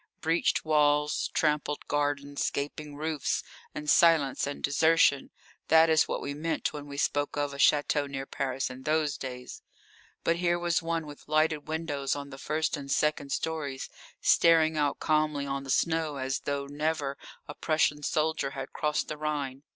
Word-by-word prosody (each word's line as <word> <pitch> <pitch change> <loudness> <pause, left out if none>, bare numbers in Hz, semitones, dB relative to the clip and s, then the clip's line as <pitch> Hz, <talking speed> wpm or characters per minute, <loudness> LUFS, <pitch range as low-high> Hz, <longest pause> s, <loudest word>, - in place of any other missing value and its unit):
Breached 165 +1 +1
walls, 150 -1 +2
trampled 150 -1 0
gardens, 145 -1 -1
gaping 145 +1 -5
roofs, 155 -1 -2 0.3
and 150 - -6
silence 150 -5 +4
and 145 - -6
desertion 145 -1 +3 0.4
that 160 0 +6
is 155 -1 +4
what - - -3
we 140 - -3
meant 160 +3 -2
when 145 -1 -7
we 140 0 -8
spoke 145 +1 0
of 145 -1 -1
a - - -7
château 145 0 +3
near 135 -1 -4
Paris 135 -1 -3
in 130 +1 -9
those 150 +1 0
days. 125 -3 -7 0.6
But 165 - +2
here 175 0 +1
was 175 0 0
one 165 -1 -2
with 145 -1 -12
lighted 155 0 +1
windows 155 -4 -2
on 140 0 -7
the 135 - -9
first 155 +3 -1
and 140 -2 -7
second 150 -2 0
stories 150 -5 -3 0.3
staring 160 -1 +4
out 145 -2 0
calmly 155 -2 +1
on 140 0 -3
the - - -10
snow 160 +1 +1
as 135 0 -2
though 140 0 -2
never 145 -1 -2 0.3
a 145 - -6
Prussian 150 -1 +1
soldier 155 -1 0
had 135 0 -6
crossed 150 0 -1
the 155 - -5
Rhine. 145 -3 -3
150 Hz, 165 wpm, -29 LUFS, 140-155 Hz, 0.6 s, that